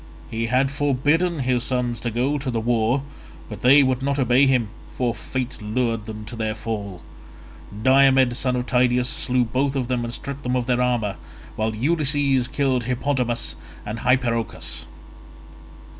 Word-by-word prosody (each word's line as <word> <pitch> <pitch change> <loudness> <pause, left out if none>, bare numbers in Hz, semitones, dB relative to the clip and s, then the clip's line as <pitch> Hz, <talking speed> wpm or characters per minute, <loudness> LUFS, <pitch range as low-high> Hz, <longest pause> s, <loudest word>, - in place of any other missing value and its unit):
He 115 0 -2
had 130 +3 +2
forbidden 145 +4 +1
his 125 -2 +1
sons 125 -2 -1
to 120 - -3
go 130 +6 0
to 135 -1 -4
the 115 -2 -1
war, 120 +3 +1 0.4
but 105 -2 -9
they 140 +3 +7
would 130 -1 0
not 140 +1 -1
obey 130 +1 +4
him, 125 -5 +2 0.2
for 120 -2 -1
fate 130 -1 -5
lured 115 0 -1
them 110 -1 -7
to 120 +3 -8
their 110 -1 -2
fall. 105 -5 -5 0.8
Diomed 130 -1 +5
son 125 0 0
of 125 0 -2
Tydeus 125 0 +2
slew 125 -1 +1
them 115 - -6
both 135 +2 +1
and 125 -2 -1
stripped 140 +3 -6
them 125 -2 -1
of 125 -1 0
their 125 0 +1
armour, 120 -6 0 0.4
while 110 0 -1
Ulysses 140 -1 +1
killed 130 -4 0
Hippodamus 125 -1 -1 0.3
and 110 +2 -5
Hypeirochus. 120 -3 -1
125 Hz, 160 wpm, -23 LUFS, 115-135 Hz, 0.8 s, they